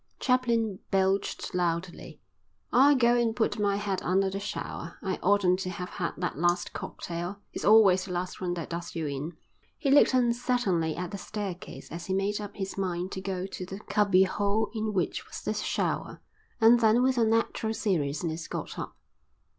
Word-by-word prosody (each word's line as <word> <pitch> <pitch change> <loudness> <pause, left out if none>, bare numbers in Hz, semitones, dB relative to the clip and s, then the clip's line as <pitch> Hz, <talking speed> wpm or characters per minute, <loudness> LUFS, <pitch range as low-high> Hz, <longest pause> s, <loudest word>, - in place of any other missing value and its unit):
Chaplin 235 -6 +1
belched 195 0 0
loudly. 175 0 -2 0.5
"I'll 280 +4 +6
go 240 -2 +4
and 235 -2 +1
put 220 -2 0
my 200 -1 +2
head 200 -2 -2
under 190 +2 +1
the 195 - -3
shower. 185 -4 -5
I 190 -2 -1
oughtn't 190 -1 +3
to 185 - -3
have 180 0 -5
had 170 - -3
that 175 -5 -3
last 175 +1 +1
cocktail. 175 +3 -5 0.2
It's - - -5
always 200 -4 +6
the 190 - -7
last 180 +1 -3
one 175 -1 -1
that 170 -1 -6
does 170 +1 -5
you 165 -2 -2
in." 145 +3 -4 0.4
He 275 - 0
looked 280 -2 +6
uncertainly 235 -9 +1
at 180 0 -4
the 200 - -5
staircase 195 -3 -6
as 170 +1 -6
he 190 - 0
made 205 +2 0
up 205 -1 -7
his 195 0 -4
mind 180 -1 -2
to 190 - -5
go 190 -1 -3
to 190 - -6
the 190 +2 -7
cubby 200 -3 +3
hole 205 +3 0
in 220 -1 -2
which 190 -3 -1
was - - -7
the - - -1
shower, - - -2 0.4
and 230 +1 +7
then 225 +2 +4
with 260 -1 +2
unnatural 225 0 +1
seriousness 160 -4 -1
got - - -5
up. - - -6
195 Hz, 180 wpm, -28 LUFS, 180-220 Hz, 0.5 s, and